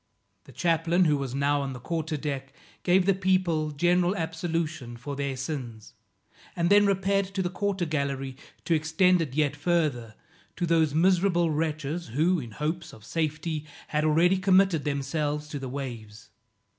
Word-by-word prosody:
The - - -14
chaplain, 170 +1 +2
who 150 -2 +3
was 135 -2 -3
now 140 +1 +1
on 135 -1 -3
the 125 - -8
quarter 160 +3 -3
deck, 140 -2 -4 0.3
gave 180 +1 +3
the 195 - +4
people 185 -5 +1
general 175 +5 +2
absolution 160 - -3
for 140 +4 -6
their 140 -1 -3
sins, 125 -6 -6 0.6
and 170 +1 +1
then 205 0 +6
repaired 195 0 +1
to 190 - 0
the 180 - -2
quarter 195 -2 -1
gallery 140 -4 -2 0.3
to 170 - +2
extend 165 +3 +3
it 140 -5 -4
yet 145 -1 +1
further, 145 -9 0 0.4
to 175 - -1
those 160 -3 +2
miserable 175 -1 +3
wretches, 155 +1 -2
who, 165 +9 +1
in 120 -5 -7
hopes 160 +5 -3
of 105 - -14
safety, 155 0 -2 0.2
had 150 0 0
already 165 +5 +4
committed 190 -5 +3
themselves 150 +1 -2
to 145 - -5
the 135 -1 -5
waves. 115 -6 -7
155 Hz, 160 wpm, -27 LUFS, 140-175 Hz, 0.6 s, then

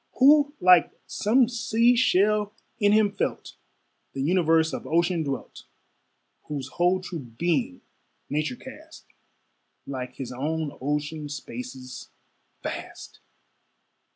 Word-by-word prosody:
Who 290 +2 +5
like 180 -1 +6
some 240 +4 +2
sea 230 +1 +2
shell, 210 -2 +2 0.2
in 205 -2 +4
him 210 -1 +4
felt - - -3 0.6
The 135 - -3
universe 165 -1 +3
of - - -5
ocean 170 +1 +1
dwelt, 140 -4 -5 0.8
Whose 140 -3 -5
whole 180 +5 +1
true 180 -2 -6
being 170 - -2 0.5
nature 155 - -2
cast 310 +6 -13 0.8
Like 125 -2 -6
his 130 -2 -6
own 150 +4 -3
ocean 150 +2 -3
spaces, 145 - -8 0.5
vast! - - -7
175 Hz, 105 wpm, -26 LUFS, 145-220 Hz, 0.8 s, like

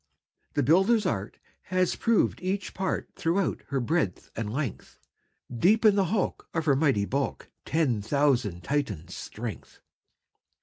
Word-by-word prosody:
"The 145 - +2
builder's 190 - +4
art 105 - -2 0.3
Has 185 0 +1
proved 230 -2 +2
each 190 +1 -2
part 190 0 -2
Throughout 175 +3 0
her 140 -1 -1
breadth 130 - -1
and 105 -1 -3
length; 130 -3 -4 0.6
Deep 210 - +3
in 215 - +8
the 195 -2 +3
hulk, 195 +2 -2
Of 165 -1 0
her 140 -3 +4
mighty 135 -8 +2
bulk, 135 +5 -3
Ten 135 -9 +1
thousand 120 -7 +1
Titans' 135 - -2
strength." 110 -4 -7
145 Hz, 135 wpm, -27 LUFS, 115-185 Hz, 0.6 s, in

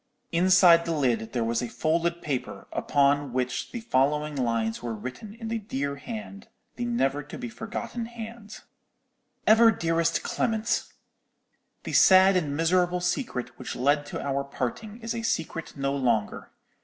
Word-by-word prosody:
"Inside 175 -1 +6
the 165 - -1
lid 120 -6 0
there 120 -2 -1
was 115 0 0
a 120 - -3
folded 170 +7 0
paper, 140 -5 -4
upon, 140 -1 +2
which 125 0 -2
the 240 - -5
following 150 - +1
lines 115 -3 -1
were 115 -2 -4
written 130 - -8
in 230 -1 -7
the 225 0 -2
dear 140 -8 -3
hand, 215 - -8 0.3
the 245 - -3
never 145 - 0
to 145 - -9
be 245 -1 -5
forgotten 225 +1 -5
hand: 225 -2 -9 0.8
"'EVER 225 +1 +7
DEAREST 165 -4 +1
CLEMENT,—_The 225 0 -4
sad 190 0 +7
and 145 -5 0
miserable 180 +2 +2
secret 175 - -3
which - - -5
led 145 +3 +1
to - - -5
our 140 0 -1
parting 140 - -5
is 230 0 -3
a 230 - -3
secret 165 -8 -3
no 140 0 -1
longer. 120 -6 0
165 Hz, 150 wpm, -27 LUFS, 135-215 Hz, 0.8 s, EVER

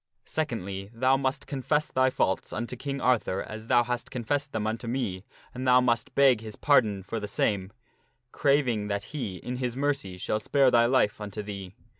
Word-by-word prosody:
Secondly, 100 -10 -3
thou 130 +3 +3
must 135 +1 -1
confess 150 +2 -1
thy 130 0 +3
faults 95 -6 0
unto 120 +3 -3
King 140 +2 -4
Arthur 120 -7 +1
as 110 +1 -8
thou 120 -1 +5
hast 120 0 -3
confessed 140 +4 -2
them 110 -1 -2
unto 115 +2 -3
me 110 -7 -2 0.3
and 130 +1 -4
thou 125 0 +7
must 120 -2 0
beg 135 -5 +5
his 110 -1 -8
par 145 -1 +5
don 100 -3 -5
for 115 +4 -4
the 105 - -5
same, 100 -1 0 0.6
craving 125 -7 +2
that 100 0 -2
he, 125 -11 -3
in 125 +8 -5
his 125 -1 -3
mercy, 140 -10 -1
shall 105 +4 -1
spare 135 +2 +3
thy 120 0 +5
life 120 -5 +2
unto 105 0 -5
thee. 100 -2 -7
120 Hz, 190 wpm, -27 LUFS, 105-130 Hz, 0.6 s, thou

